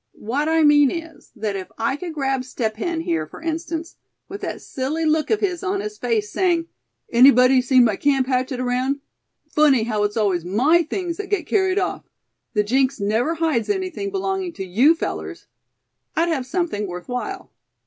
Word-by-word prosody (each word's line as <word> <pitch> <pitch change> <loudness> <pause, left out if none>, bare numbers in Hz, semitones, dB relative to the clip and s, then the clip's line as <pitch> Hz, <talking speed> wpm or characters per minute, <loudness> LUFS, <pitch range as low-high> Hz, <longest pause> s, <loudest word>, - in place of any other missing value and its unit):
What 280 +8 -1
I 320 0 +3
mean 290 -2 +6
is, 330 0 -8
that 210 -3 -3
if 190 -1 -6
I 230 +4 0
could 335 +2 -6
grab 270 -3 0
Step 225 -4 -3
Hen 335 +6 -2
here, 335 0 -1
for - - -12
instance, 330 +1 -4 0.3
with 400 +1 -8
that - - -4
silly 290 +5 -2
look 310 0 +1
of 440 - +1
his 365 -4 -1
on 385 +1 -1
his 420 +1 -6
face, 435 -2 -1
saying: 345 -5 +1 0.4
'Anybody 255 +1 +6
seen 255 0 +5
my 210 -4 +1
camp 275 -2 +2
hatchet 255 0 -1
around? 255 +3 0 0.5
Funny 285 -6 +4
how 215 -2 -1
it's 205 +1 -1
always 195 -6 +1
my 255 - +3
things 340 +1 -3
that 410 -2 -6
get 390 -6 0
carried 380 +1 +1
off! 390 - -1 0.5
The 210 - +3
jinx 260 +4 +1
never 220 +11 0
hides 315 -8 0
anything 380 0 -2
belonging 385 -2 -2
to 190 - -6
you 245 - +4
fellers!' - - -5 0.7
I'd 335 +1 +2
have 270 -6 -1
something 320 - -2
worth 180 0 -7
while." 250 +11 -5
290 Hz, 180 wpm, -22 LUFS, 245-345 Hz, 0.7 s, mean